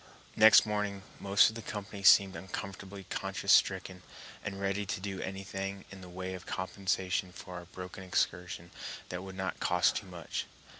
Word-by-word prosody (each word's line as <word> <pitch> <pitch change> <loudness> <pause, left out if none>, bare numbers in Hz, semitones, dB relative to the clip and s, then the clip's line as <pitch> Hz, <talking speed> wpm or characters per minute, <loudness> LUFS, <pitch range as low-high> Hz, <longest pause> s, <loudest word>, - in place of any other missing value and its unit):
] - - -25
Next 110 - +9
morning 105 -2 -2 0.2
most 100 +1 +5
of 110 - -9
the 115 - -5
company 105 -2 -6
seemed 95 -1 +7
uncomfortably 95 +2 -7
conscience 95 -1 -1
stricken, 90 -1 +3 0.4
and 95 -1 -4
ready 100 +1 0
to 100 -1 -3
do 95 0 -4
anything 95 0 -5
in 100 -1 -10
the 90 - -10
way 95 +1 -5
of 90 - -8
compensation 95 -1 -1
for 90 - -10
our 90 -1 -7
broken 90 +1 -8
excursion 85 -1 -1 0.4
that 90 0 -4
would 95 0 -8
not 95 -1 -3
cost 90 0 +3
too 100 - -6
much. 85 -4 -5
95 Hz, 170 wpm, -32 LUFS, 90-100 Hz, 0.4 s, Next